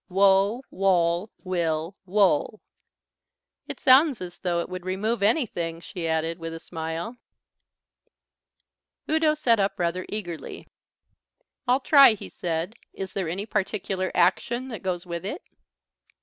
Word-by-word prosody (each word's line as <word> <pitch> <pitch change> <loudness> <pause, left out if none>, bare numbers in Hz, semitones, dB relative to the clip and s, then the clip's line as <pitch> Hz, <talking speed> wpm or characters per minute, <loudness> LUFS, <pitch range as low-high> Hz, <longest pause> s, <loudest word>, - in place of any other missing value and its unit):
_ - - -65
Wo, 195 +5 +3
woll, 180 0 +1
will, 170 -1 -1
wole." 195 0 +2 1.1
"It - - -6
sounds 275 0 +5
as 180 -1 -8
though 175 -2 0
it - - -5
would 185 -1 -7
remove 200 +5 -1
anything," 200 - 0
she 170 0 -5
added, 160 +1 -1
with 165 0 -5
a - - -7
smile. 165 +8 -5 1.9
Udo 315 -1 +2
sat 235 -7 +2
up 195 0 0
rather 175 +1 -2
eagerly. 175 -6 -6 1.0
"I'll 255 +3 +3
try," 275 -5 +7
he - - -9
said. 170 +3 -3 0.2
"Is 190 -1 -6
there 190 -5 -2
any 195 +5 -3
particular 195 -3 -2
action 235 +8 +1
that 225 - -6
goes 180 -1 -3
with 170 -1 -5
it?" 250 - -5
190 Hz, 135 wpm, -25 LUFS, 170-215 Hz, 1.9 s, try